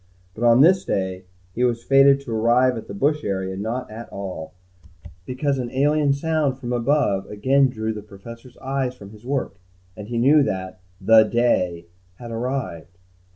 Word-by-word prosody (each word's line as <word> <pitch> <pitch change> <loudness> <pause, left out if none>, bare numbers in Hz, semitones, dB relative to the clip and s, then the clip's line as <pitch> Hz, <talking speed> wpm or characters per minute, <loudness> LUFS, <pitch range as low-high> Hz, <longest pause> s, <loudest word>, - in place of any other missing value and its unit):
But 110 - -6
on 120 +1 +5
this 180 +4 +5
day, 95 -1 -3 0.3
he 125 - -1
was 120 -2 0
fated 135 +1 +5
to 120 -5 -5
arrive 120 +3 +3
at 115 - -8
the - - -8
bush 150 +7 0
area 95 -1 -3
not 110 +5 -4
at 115 +2 -9
all, 95 -4 -7 0.7
because 135 +2 -1
an 120 -2 -3
alien 145 +2 +2
sound 145 -2 0
from 125 -2 -5
above 120 -6 +1
again 135 +6 +2
drew 110 -2 -3
the 105 - -7
Professor's 115 +4 -13
eyes 135 -1 -3
from 100 -4 -13
his 110 +3 -14
work, 135 -8 -3 0.4
and 105 -1 -9
he 120 +1 -4
knew 140 +6 +5
that 95 -7 -3 0.2
the 110 0 +6
day 90 -8 0 0.3
had 120 +3 -10
arrived. 115 -9 -4
120 Hz, 170 wpm, -22 LUFS, 105-135 Hz, 0.7 s, the